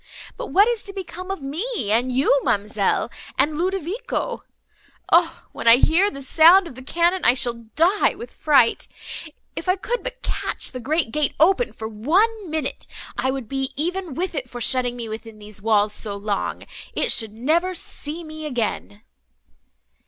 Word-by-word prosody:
But - - -6
what 405 +3 +5
is 475 -3 0
to 395 - -6
become 370 -1 -7
of 390 -7 -4
me 315 - -2
and 245 +4 +2
you, 270 +2 +3
ma'amselle, 205 0 0 0.3
and 305 +1 +2
Ludovico? 380 +6 -2 0.7
O! - - +3
when - - -5
I 230 - +10
hear 335 +10 +4
the 275 -7 -7
sound 340 +7 +6
of 335 - -9
the 260 - -11
cannon, 340 +6 +1
I 245 - +5
shall 235 -3 -2
die 360 +7 +3
with 240 - -9
fright. 275 -6 +3 0.7
If - - -4
I 365 - +4
could 475 +5 -3
but - - -7
catch - - -3
the 255 - -6
great 290 0 0
gate 300 +1 0
open 385 +10 +4
for 220 - -6
one 365 - +1
minute, 310 -3 -3 0.3
I 250 +2 0
would 265 -3 -3
be 270 +1 -2
even 350 0 -2
with 360 +3 -2
it 265 -5 -3
for 245 - -7
shutting 245 0 +2
me 235 -2 -5
within 220 0 -8
these 210 -1 -5
walls 210 -1 +2
so 210 -2 -1
long!—it 200 0 -3
should 220 -2 +1
never 330 +11 +1
see 325 0 -6
me 310 -1 -7
again." 220 -4 -3
290 Hz, 170 wpm, -22 LUFS, 235-365 Hz, 0.7 s, I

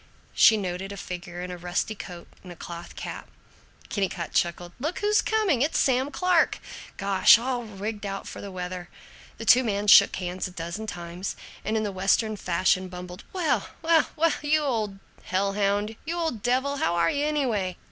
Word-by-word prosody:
She 220 - +6
noted 190 0 -4
a 200 - -7
figure 180 -1 -6
in 180 - -5
a 180 - -7
rusty 180 +5 -1
coat 175 -4 -9
and 180 - -11
a - - -9
cloth 170 +1 -9
cap. - - -7 0.6
Kennicott 190 -4 -2
chuckled, 175 0 0
"Look 310 +7 -2
who's 420 +1 +3
coming! 420 - +1
It's 295 +4 +1
Sam 260 +1 +2
Clark! 360 +1 +2 0.4
Gosh, 195 +2 +6
all 245 0 -2
rigged 210 0 -5
out 195 -1 -4
for - - -8
the 200 - -7
weather." 180 -1 -6 0.5
The 225 - -7
two 245 +3 +7
men 205 -3 -1
shook 205 - +8
hands 180 0 -3
a - - -11
dozen 170 +5 -5
times 175 0 -5 0.3
and, 220 +1 0
in 215 - 0
the 205 - -2
Western 195 +3 +1
fashion, 185 0 +1
bumbled, 180 +1 -9
"Well, 355 -4 0
well, 325 -1 +4
well, 330 +1 +4
well, - - -2
you 310 0 +5
old 220 -8 -1 0.3
hell 195 +1 0
hound, 205 +2 0
you 330 +2 -3
old 320 -11 -2
devil, 260 +4 +1
how 275 - +1
are 170 -1 +3
you, 285 - -1
anyway? 230 -12 0
200 Hz, 190 wpm, -26 LUFS, 180-255 Hz, 0.6 s, shook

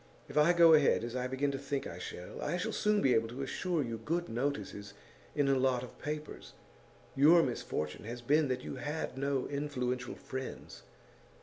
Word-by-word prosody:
If - - -10
I 150 +3 +6
go 170 -2 +7
ahead 150 -6 +4
as 120 +1 -4
I 125 0 -1
begin 135 +2 0
to 135 - -4
think 140 0 -3
I - - -7
shall, 90 - -7
I 175 - -1
shall 180 - -2
soon 210 -1 +2
be 130 - +5
able 115 0 +2
to 125 +4 -5
assure 170 +3 -1
you 115 -2 -4
good 170 +9 -2
notices 105 -5 -3 0.4
in 145 -2 +2
a 135 - +4
lot 130 -1 +2
of 125 - -11
papers. 150 +1 -6 0.6
Your 160 +5 +7
misfortune 80 - -3
has 120 +2 -6
been 150 +4 +3
that 130 -1 -2
you - - -6
had 150 -2 -4
no 135 0 -1
influential 130 -3 -2
friends. 130 0 -7
135 Hz, 190 wpm, -32 LUFS, 125-150 Hz, 0.6 s, go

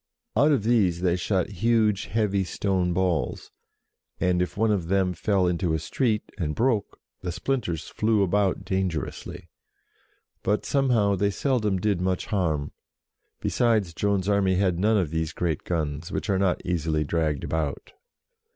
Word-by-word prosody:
Out 145 +7 +4
of 135 -8 +2
these 100 -7 +2
they 90 -1 +2
shot 90 +1 0
huge, 110 -3 +2
heavy 100 -3 0
stone 95 -1 0
balls, 90 -3 -1 0.7
and 90 -1 +2
if 90 - -3
one 110 +1 +2
of 95 -5 0
them 95 0 +1
fell 95 +1 +1
into 90 -2 0
a - - +1
street, 110 - 0 0.2
and 75 -4 -1
broke, 115 -4 0 0.2
the 90 - -3
splinters 85 - -2
flew 105 -2 +1
about 95 0 +1
dangerously. 95 -5 -3 0.9
But, 105 +2 0
somehow, 120 -8 +2
they 100 +2 +2
seldom 105 -2 0
did 95 -1 0
much 90 0 0
harm, 80 -8 -1 0.7
be - - 0
sides 110 -8 +1
Joan's 100 +1 0
army 100 -2 +2
had 90 -2 +1
none 110 +3 +3
of 90 -7 0
these 80 -1 -2
great 85 -4 -2
guns, 80 0 -2
which 105 - -2
are 95 - +2
not 95 -2 0
easily 80 -3 0
dragged 75 -2 -1
about. 80 -3 -3
95 Hz, 155 wpm, -26 LUFS, 85-105 Hz, 0.9 s, Out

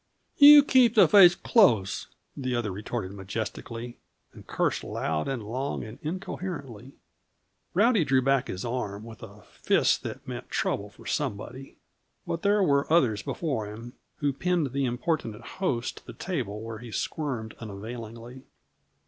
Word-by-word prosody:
"You 290 0 +10
keep 255 -5 +4
the 215 - +7
face 180 -4 +8
close," 115 - +3 0.3
the 130 -2 -2
other 115 -4 -1
retorted 100 0 -5
majestically; 110 +4 -6 0.3
and - - -14
cursed - - -1
loud 80 -1 -2
and 130 -5 -3
long 130 +6 -3
and 110 +2 -10
incoherently. 150 - -6 0.8
Rowdy 215 -1 +4
drew 135 -2 +3
back 135 -1 +2
his 95 - -5
arm, 110 -4 -4
with 115 -1 -11
a 105 -1 -12
fist - - +1
that - - -7
meant - - -7
trouble - - -2
for - - -18
somebody; 130 +6 -4 0.5
but 165 - -3
there 205 0 +3
were 140 -3 +1
others 120 -11 +3
before 130 -3 -3
him 115 +4 -9 0.2
who 145 -2 -1
pinned 170 -2 0
the 140 0 0
importunate 120 - -3
host 125 -11 -1
to - - -13
the - - -8
table, 115 - -4
where 115 -1 -7
he 120 0 -10
squirmed 125 -5 -3
unavailingly. 115 +3 -8
125 Hz, 150 wpm, -27 LUFS, 110-160 Hz, 0.8 s, You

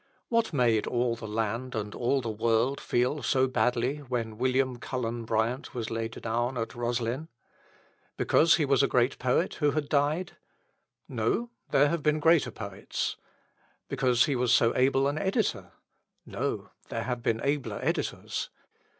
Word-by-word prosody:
What 230 -3 +2
made 120 -7 +2
all 120 -1 +1
the 115 -1 -8
land 115 +4 -2
and 105 -1 -3
all 130 +3 +1
the 115 -2 -3
world 115 +5 +1
feel 125 +5 0
so 130 +1 +2
badly 125 +2 +1
when 120 -6 -4
William 130 0 +1
Cullen 120 -2 -3
Bryant 115 +5 -1
was 115 -2 -3
laid 115 0 -3
down 120 +3 -1
at 115 -1 -3
Roslyn? 120 +4 -2 0.9
Because 165 +1 +4
he 155 - +1
was 135 -1 +3
a 140 - +4
great 125 +2 +1
poet 130 +8 +1
who 150 - +4
had 150 -1 -2
died? 150 +5 0 0.7
No; 240 0 -1 0.2
there 145 +1 +4
have 170 0 -1
been 150 +1 +2
greater 165 0 +4
poets. - - -4 0.7
Because 125 -2 +3
he 145 - 0
was 125 -1 +1
so 115 -1 +4
able 135 +1 +3
an 145 +2 -1
editor? 190 +4 -1 0.5
No; - - -3 0.2
there - - -3
have 125 -1 -3
been 115 -1 0
abler 135 -7 -1
editors. - - -2
125 Hz, 155 wpm, -28 LUFS, 115-140 Hz, 0.9 s, Because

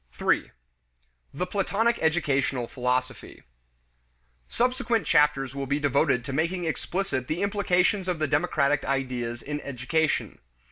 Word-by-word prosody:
3. - - +1 0.8
The 180 +6 -3
Platonic 205 +5 0
Educational 140 -6 +1
Philosophy. 125 0 -3 1.0
Subsequent 240 - 0
chapters 150 -4 +3
will 140 -1 -3
be 140 +2 0
devoted 140 -4 +2
to 135 - -4
making 170 +4 -1
explicit 160 -4 -2
the 170 +5 -1
implications 200 -1 +1
of 180 -2 0
the 155 0 0
democratic 145 0 +1
ideas 125 -3 -2
in 150 +1 -4
education. 150 +4 -1
150 Hz, 120 wpm, -26 LUFS, 135-180 Hz, 1.0 s, chapters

